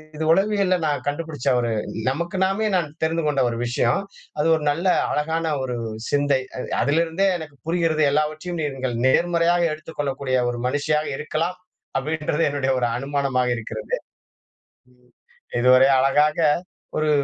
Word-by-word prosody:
இது 155 - -3
உளவியல்ல 195 +1 +3
நான் 145 -1 -1
கண்டுபுடிச்ச 145 -2 -4
ஒரு 120 -1 -1 0.4
நமக்கு 170 +7 -3
நாமே 195 +3 0
நான் 160 -5 -1
தெரிந்து 165 +1 0
கொண்ட 145 -2 +1
ஒரு 115 - -4
விஷயம். 120 0 +1 0.4
அது 150 - +2
ஒரு 155 - -3
நல்ல 170 +6 -1 0.2
அழகான 160 +2 -1
ஒரு 125 -2 -3 0.3
சிந்தை. 140 -2 +2 0.2
அ - - -4 0.2
அதிலிருந்தே 165 +6 +1
எனக்கு 155 -3 -9
புரிகிறது 165 -2 +1
எல்லாவற்றையும் 155 +4 -1
நீங்கள் 130 -4 -3
நேர்மறையாக 170 +4 +3
எடுத்துக்கொள்ளக்கூடிய 140 -4 -3
ஒரு 120 - -5
மனுஷியாக 150 +3 0
இருக்கலாம், 165 +4 -2 0.4
அப்டீன்றது 155 +2 -1
என்னுடைய 135 -2 0
ஒரு 120 - +1
அனுமானமாக 135 -2 0
இருக்கிறது. 110 -1 -4
ம். - - -14 1.6
இதுவரை 130 +2 +6
அழகாக 150 +3 +3 0.6
ஒரு 155 0 +1
150 Hz, 130 wpm, -23 LUFS, 135-165 Hz, 1.6 s, இதுவரை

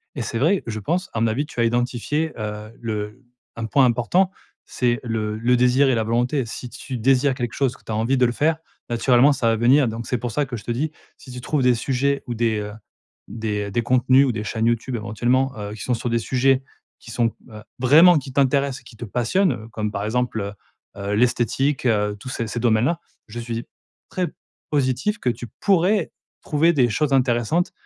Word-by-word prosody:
Et - - -3
c'est 115 - -3
vrai, 175 +9 +2
je 110 -1 -3
pense, 175 - -2
à 115 - -2
mon 115 - +3
avis, 120 +7 -1
tu 145 - -9
as - - +4
identifié, 120 +6 0
heu, 105 0 -6
le 105 -1 -4 0.4
un 115 - -3
point 130 +4 +4
important, 125 +11 +2 0.3
c'est 120 -1 0
le 110 -2 -2
le 120 +3 +2
désir 125 +3 +4
et 130 - +3
la 110 - +1
volonté. 120 +4 0
Si 120 +2 -7
tu 130 +1 -6
désires 135 +3 +3
quelque 120 -2 -4
chose, 130 -3 0
que - - -21
tu - - -7
as - - -1
envie 115 +5 +1
de 125 - +4
le 120 - +1
faire, 155 +6 +1 0.3
naturellement 120 +4 +4
ça 130 -4 -1
va 115 - +3
venir. 125 +5 +4
Donc, 115 +1 -5
c'est 125 - 0
pour 120 0 -4
ça 145 +7 0
que 125 -2 -6
je 110 - -10
te - - -4
dis, 145 +6 -1 0.3
si 130 - -13
tu 125 0 -7
trouves 145 +3 -1
des 125 -1 +4
sujets 135 +3 0
ou 120 - -2
des, 115 -2 0
heu, 105 0 -5 0.5
des 105 -1 -3
des 120 +3 0
contenus 130 +3 +4
ou 130 - +1
des 110 -2 -4
chaînes 110 +1 -2
YouTube 120 +2 -1
éventuellement, 120 +5 0
heu, 105 0 -5
qui 110 - -9
sont 125 - -1
sur 120 +1 -2
des 115 0 +1
sujets, 130 +3 +2 0.4
qui 115 - -12
sont, 115 0 +1 0.2
heu, 110 -1 -10 0.2
vraiment 160 +7 +7
qui 135 -2 -5
t'intéressent 140 0 +1
et - - -26
qui 120 -2 -15
te 120 - -6
passionnent, 125 - +1
heu, 110 -2 -8
comme 105 -1 -3
par 100 0 -3
exemple 120 +1 -1
heu, 100 +1 -4 0.5
heu 100 +1 -2
l'esthétique, 125 +4 +1
heu, 105 -3 +1
tous 125 - -8
ces 115 -2 -3
ces 120 - -4
domaines-là, 120 +8 +2 0.3
je 120 +2 -7
suis 115 0 -4 0.4
très 180 -1 -1 0.4
positif 140 - 0
que 125 - 0
tu 120 0 -4
pourrais 195 0 +2 0.3
trouver 160 +3 +2
des 125 -5 +3
choses 145 +5 0
intéressantes 130 +5 +1
120 Hz, 220 wpm, -22 LUFS, 115-135 Hz, 0.5 s, vraiment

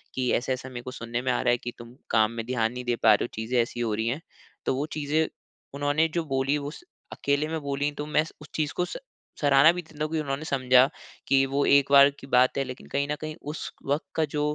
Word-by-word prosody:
कि 130 -1 0
ऐसा-ऐसा 130 +1 -1
मेरे 120 -1 -7
को 130 - -6
सुनने 120 0 -4
में 130 - +1
आ - - 0
रहा 125 - +3
है 120 - +3
कि 120 0 -6
तुम 120 +1 -11 0.2
काम 110 0 +4
में 115 -1 -5
ध्यान 115 -2 0
नहीं 125 - -5
दे 120 - +1
पा 110 -1 +8
रहे 105 - +2
हो - - -5
चीज़े 120 +2 +1
ऐसी 120 +1 -4
हो 115 -3 0
रही 110 +1 -1
हैं। 130 +7 -2 0.4
तो - - +1
वो 140 +3 -1
चीज़ें 155 +2 +1 0.5
उन्होंने 145 +3 +1
जो 170 - +1
बोली 135 +2 +1
वो 145 - -5
उस 155 - -11 0.3
अकेले 145 +2 0
में 160 - -2
बोली 140 +1 -1
तो 150 - -2
मैं 150 0 +2 0.2
उस 150 - -12
चीज़ 150 -2 -1
को 180 - +2
स - - -6 0.4
सराहना 145 +2 +6
भी 180 - -4
देता 155 -2 -7
हूँ 155 - -3
कि 160 - +1
उन्होंने 145 0 -3
समझा 130 -2 +5 0.4
कि 135 0 +4
वो 140 +1 0
एक 140 0 +4
बार 140 0 +8
की 135 - -11
बात 130 -1 +3
है। 135 - +2
लेकिन 130 -1 -9
कहीं 140 0 0
न - - 0
कहीं 155 0 -5 0.2
उस 155 - -6 0.2
वक़्त 145 +3 0
का 160 - +2
जो 150 - 0
135 Hz, 260 wpm, -26 LUFS, 125-150 Hz, 0.5 s, पा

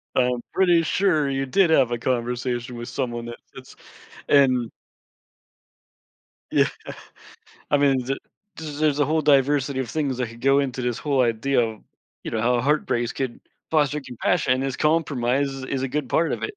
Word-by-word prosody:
I'm 125 -1 +1
pretty 175 -3 +4
sure 155 -4 +1
you 135 0 -1
did 185 +6 +3
have 130 -6 +4
a 120 - 0
conversation 120 0 -2
with 120 - -7
someone 120 -3 -3
that 120 0 -7 0.2
fits - - -12 0.5
and 130 -4 +4 1.8
Yeah, - - +4 1.0
I 145 - +4
mean, 135 -3 +2
the 135 +1 -2 0.4
the 160 - -8 0.2
there's 150 -2 +2
a 145 - +3
whole 155 +3 +1
diversity 140 -1 +2
of 120 -4 -4
things 145 -5 -1
that 125 -2 -2
could 115 +1 -13
go 135 +1 +4
into 130 -3 -2
this 120 -2 -1
whole 140 -3 +1
idea 120 +3 +1
of, 110 -2 -3 0.4
you - - -4
know, 110 - -1
how 120 +1 +2
heartbreaks 125 -3 0
could 130 -3 -4 0.3
foster 150 -1 +1
compassion, 125 +2 0
and 130 - -2
this 135 -1 -2
compromise 140 -4 +1
is 135 -1 -7
is 135 0 -3
a 135 - -1
good 145 0 -3
part 165 0 +1
of - - -4
it. 420 -1 -4
135 Hz, 180 wpm, -23 LUFS, 125-145 Hz, 1.8 s, pretty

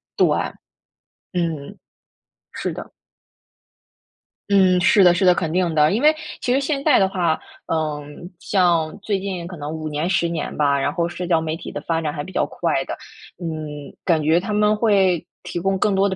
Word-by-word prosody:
对， - - +4 1.1
嗯， 165 -5 -3 0.7
是 - - -3
的。 - - -8 1.6
嗯， 185 -2 +5
是 195 +1 +5
的， 175 -1 +7
是 175 - 0
的， 180 -1 +6
肯 165 -2 -2
定 175 -3 +1
的。 150 0 +4
因 230 - 0
为 305 +1 +6 0.3
其 245 - 0
实 265 - +3
现 275 0 -2
在 300 -4 +5
的 190 - +4
话， 175 -4 0 0.3
嗯， 155 +2 -3
像 170 -6 +1
最 200 -3 0
近 185 -3 -4
可 180 - -8
能 150 +1 -5
5 155 -1 -5
年、 155 +4 -2
10 170 - +2
年 165 -3 -4
吧， 140 -2 +2
然 140 - 0
后 170 +1 -1
社 175 +1 -5
交 170 -2 +3
媒 160 0 -2
体 - - -8
的 - - -4
发 165 -1 -1
展 150 - -2
还 145 -1 -5
比 190 - -10
较 - - +1
快 - - -1
的。 - - -4 0.4
嗯， 155 -4 -6
感 160 -3 +2
觉 160 +3 +4
他 195 +4 -5
们 210 0 +3
会 195 -6 +2 0.2
提 175 - -4
供 195 +2 0
更 205 +1 +1
多 195 +1 +3
的 190 - -2
175 Hz, 200 characters per minute, -21 LUFS, 155-195 Hz, 1.6 s, 的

